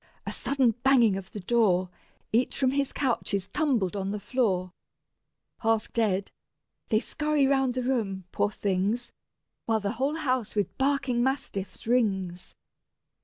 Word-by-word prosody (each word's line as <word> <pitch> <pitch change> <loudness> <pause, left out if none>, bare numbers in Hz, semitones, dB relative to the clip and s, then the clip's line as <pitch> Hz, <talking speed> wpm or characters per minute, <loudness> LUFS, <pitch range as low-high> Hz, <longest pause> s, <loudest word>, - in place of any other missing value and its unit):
a - - -3
sudden 270 -4 +2
banging 245 -6 +5
of 190 -1 -7
the 210 - -6
door: 185 -3 +2 0.5
Each 240 +3 +2
from 260 -2 +2
his 275 0 0
couch 255 -6 0
is 195 -1 -2
tumbled 235 - 0
on 195 -1 -2
the 210 +1 -3
floor: 190 -6 0 0.9
Half 225 -1 0
dead, 200 -4 +1 0.6
they 215 - +4
scurry 300 +2 0
round 270 -2 +2
the 255 - -1
room, 215 -7 -1
poor 205 - +1
things, 205 +4 -1 0.6
While 225 -1 +2
the 200 - -1
whole 285 +3 +1
house 255 -9 -1
with 205 -1 -1
barking 270 -3 +1
mastiffs 205 -8 -2
rings. 195 -7 0
230 Hz, 145 wpm, -27 LUFS, 195-265 Hz, 0.9 s, banging